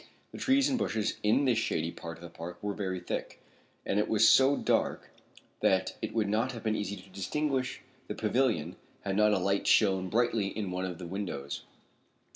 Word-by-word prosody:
The -, -, -9 dB
trees 270 Hz, +1 st, +3 dB
and 265 Hz, -3 st, 0 dB
bushes 110 Hz, 0 st, -1 dB
in 110 Hz, +7 st, +3 dB
this 120 Hz, -4 st, +3 dB
shady 80 Hz, -6 st, -1 dB
part 85 Hz, -1 st, -8 dB
of 85 Hz, -, -14 dB
the 85 Hz, -, -8 dB
park 85 Hz, +1 st, -7 dB
were 105 Hz, 0 st, -1 dB
very 95 Hz, -2 st, -3 dB
thick, 90 Hz, -, -5 dB, 0.5 s
and 100 Hz, -, +1 dB
it 105 Hz, -, +1 dB
was 110 Hz, 0 st, +5 dB
so 135 Hz, +1 st, +6 dB
dark -, -, 0 dB, 0.5 s
that 95 Hz, 0 st, +2 dB
it -, -, -4 dB
would 110 Hz, -3 st, +2 dB
not 110 Hz, +5 st, 0 dB
have 115 Hz, -, -8 dB
been 110 Hz, -1 st, +1 dB
easy 100 Hz, -1 st, -3 dB
to 95 Hz, 0 st, -14 dB
distinguish 130 Hz, +7 st, -2 dB, 0.3 s
the -, -, -4 dB
pavilion 110 Hz, -, 0 dB, 0.2 s
had 95 Hz, -1 st, -2 dB
not 105 Hz, +1 st, +4 dB
a 105 Hz, -, +3 dB
light 100 Hz, +2 st, 0 dB
shone 95 Hz, -3 st, +4 dB
brightly 115 Hz, -2 st, +1 dB
in 100 Hz, -2 st, -4 dB
one 90 Hz, +1 st, -2 dB
of 90 Hz, -2 st, -5 dB
the 90 Hz, -, -7 dB
windows. 85 Hz, -7 st, -5 dB
105 Hz, 200 wpm, -30 LUFS, 95-115 Hz, 0.5 s, so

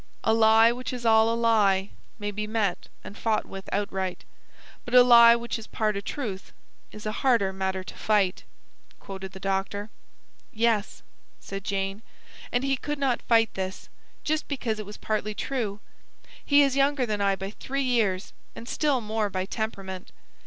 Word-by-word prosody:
'" -, -, -37 dB
"'A -, -, +3 dB
lie 225 Hz, +1 st, +6 dB
which 250 Hz, +1 st, -5 dB
is 245 Hz, -2 st, -6 dB
all 220 Hz, 0 st, +5 dB
a 230 Hz, -, 0 dB
lie 205 Hz, -4 st, +2 dB, 0.3 s
May 205 Hz, -1 st, -3 dB
be 210 Hz, +1 st, -4 dB
met 210 Hz, -5 st, -1 dB, 0.2 s
and 205 Hz, -, -10 dB
fought 220 Hz, -1 st, 0 dB
with 195 Hz, 0 st, -9 dB
outright; 190 Hz, -3 st, -2 dB, 0.6 s
But 245 Hz, -, -3 dB
a 250 Hz, -, +10 dB
lie 235 Hz, -1 st, +8 dB
which 235 Hz, 0 st, -3 dB
is 225 Hz, -, -10 dB
part 215 Hz, -2 st, -1 dB
a 200 Hz, -, -2 dB
truth 205 Hz, -5 st, -5 dB, 0.4 s
Is 210 Hz, -, -11 dB
a 215 Hz, -, -1 dB
harder 230 Hz, -8 st, +3 dB
matter 190 Hz, 0 st, -2 dB
to -, -, -9 dB
fight,'" 200 Hz, -4 st, +1 dB, 0.6 s
quoted 190 Hz, -1 st, -8 dB
the 190 Hz, -, -9 dB
doctor. 195 Hz, +2 st, -2 dB, 0.6 s
"Yes," 225 Hz, -2 st, 0 dB, 0.4 s
said 195 Hz, 0 st, -7 dB
Jane. 195 Hz, +1 st, -2 dB, 0.5 s
"And 245 Hz, +1 st, 0 dB
he 270 Hz, -1 st, +1 dB
could 295 Hz, +3 st, -4 dB
not 270 Hz, -3 st, 0 dB
fight 225 Hz, -2 st, +3 dB
this, 190 Hz, 0 st, -5 dB, 0.3 s
just 310 Hz, 0 st, -1 dB
because 240 Hz, -6 st, -2 dB
it 210 Hz, -, -6 dB
was 210 Hz, -, -9 dB
partly 215 Hz, -1 st, -2 dB
true. 220 Hz, -7 st, -3 dB, 0.6 s
He 285 Hz, 0 st, +5 dB
is 275 Hz, -1 st, +1 dB
younger 275 Hz, -1 st, +2 dB
than 210 Hz, -3 st, -2 dB
I 200 Hz, -1 st, +2 dB
by 195 Hz, +1 st, -6 dB
three 275 Hz, +5 st, -3 dB
years, 220 Hz, -7 st, 0 dB, 0.2 s
and 235 Hz, -, -9 dB
still 280 Hz, -2 st, +1 dB
more 215 Hz, -1 st, -1 dB
by 185 Hz, -1 st, -2 dB
temperament. 195 Hz, -3 st, -5 dB
215 Hz, 175 wpm, -26 LUFS, 195-235 Hz, 0.6 s, a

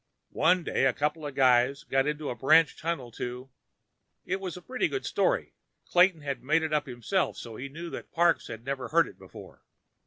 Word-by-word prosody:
One 180 Hz, +2 st, +3 dB
day, 135 Hz, -, 0 dB
a 130 Hz, -, +3 dB
couple 150 Hz, +1 st, -2 dB
of 140 Hz, -, -8 dB
guys 130 Hz, +3 st, +3 dB
went 135 Hz, +3 st, +1 dB
to 150 Hz, -3 st, -4 dB
a -, -, -4 dB
branch 155 Hz, +1 st, +4 dB
tunnel 155 Hz, -7 st, -4 dB
to—" 125 Hz, +3 st, -6 dB, 0.7 s
It 190 Hz, +2 st, -2 dB
was 185 Hz, -2 st, -5 dB
a -, -, -10 dB
very 250 Hz, +7 st, -1 dB
good 400 Hz, -, -4 dB
story. -, -, 0 dB, 0.3 s
Clayton 180 Hz, -2 st, +4 dB
had 140 Hz, -2 st, -4 dB
made 160 Hz, +4 st, +2 dB
it 155 Hz, -1 st, -2 dB
up 150 Hz, -1 st, +1 dB
himself, 130 Hz, -, -1 dB
so 115 Hz, -2 st, -8 dB
he 135 Hz, +5 st, -6 dB
knew 170 Hz, +4 st, -8 dB
that -, -, -8 dB
Parks 170 Hz, 0 st, +2 dB
had 115 Hz, +1 st, -8 dB
never 135 Hz, -2 st, -3 dB
heard -, -, +3 dB
it -, -, -14 dB
before. -, -, -13 dB
150 Hz, 205 wpm, -28 LUFS, 130-170 Hz, 0.7 s, branch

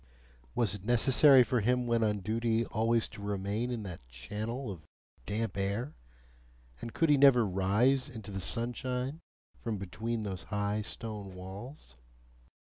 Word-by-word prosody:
Was 110 Hz, -6 st, +1 dB
it 100 Hz, -2 st, -8 dB
necessary 130 Hz, +3 st, +6 dB
for 125 Hz, 0 st, 0 dB
him 125 Hz, +3 st, +2 dB
when 115 Hz, -1 st, +2 dB
on 105 Hz, -2 st, 0 dB
duty 115 Hz, +3 st, 0 dB
always 115 Hz, +1 st, +1 dB
to -, -, -11 dB
remain 100 Hz, +3 st, -2 dB
in 120 Hz, -3 st, -3 dB
that 90 Hz, -11 st, -8 dB
channel 105 Hz, -, -5 dB
of 90 Hz, -4 st, -8 dB, 0.5 s
damp 110 Hz, +1 st, -2 dB
air, 100 Hz, +8 st, -2 dB, 0.9 s
and 115 Hz, -, -5 dB
could 165 Hz, +4 st, +2 dB
he 145 Hz, -, +6 dB
never 135 Hz, -4 st, +6 dB
rise 105 Hz, +9 st, +2 dB
into 110 Hz, -5 st, -8 dB
the 95 Hz, -1 st, -4 dB
sunshine 125 Hz, -, -3 dB, 0.4 s
from 115 Hz, -3 st, -3 dB
between 110 Hz, +5 st, -3 dB
those 95 Hz, -4 st, -4 dB
high 105 Hz, +1 st, -1 dB
stone 105 Hz, -3 st, -6 dB
walls? 95 Hz, -, -10 dB
110 Hz, 145 wpm, -31 LUFS, 100-125 Hz, 0.9 s, necessary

